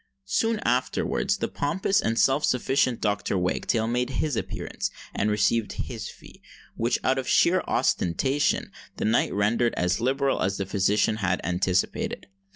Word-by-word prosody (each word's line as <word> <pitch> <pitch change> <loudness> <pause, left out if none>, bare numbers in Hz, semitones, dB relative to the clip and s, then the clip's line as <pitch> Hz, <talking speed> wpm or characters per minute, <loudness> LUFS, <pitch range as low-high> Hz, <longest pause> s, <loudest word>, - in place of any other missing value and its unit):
Soon 225 -1 0
afterwards 125 +2 0
the - - -2
pompous 190 +6 0
and 115 0 -1
self 135 +4 +3
sufficient 130 -1 +1
Dr. 105 -2 0
Wagtail 95 +5 0
made 125 +2 0
his 140 +1 -1
appearance, - - -4 0.2
and 105 - 0
received 105 +1 +1
his 115 -4 -5
fee, - - -15 0.3
which, 115 +2 +1
out 130 +1 +2
of 130 - -5
sheer 185 +2 +4
ostentation, 130 - +1 0.3
the - - -2
knight 110 +2 +2
rendered 110 +4 +1
as 90 +4 0
liberal 135 +2 +1
as 95 +1 0
the 100 - -2
physician 100 +2 +1
had 95 -3 0
anticipated. 90 +1 -1
115 Hz, 150 wpm, -26 LUFS, 100-135 Hz, 0.3 s, sheer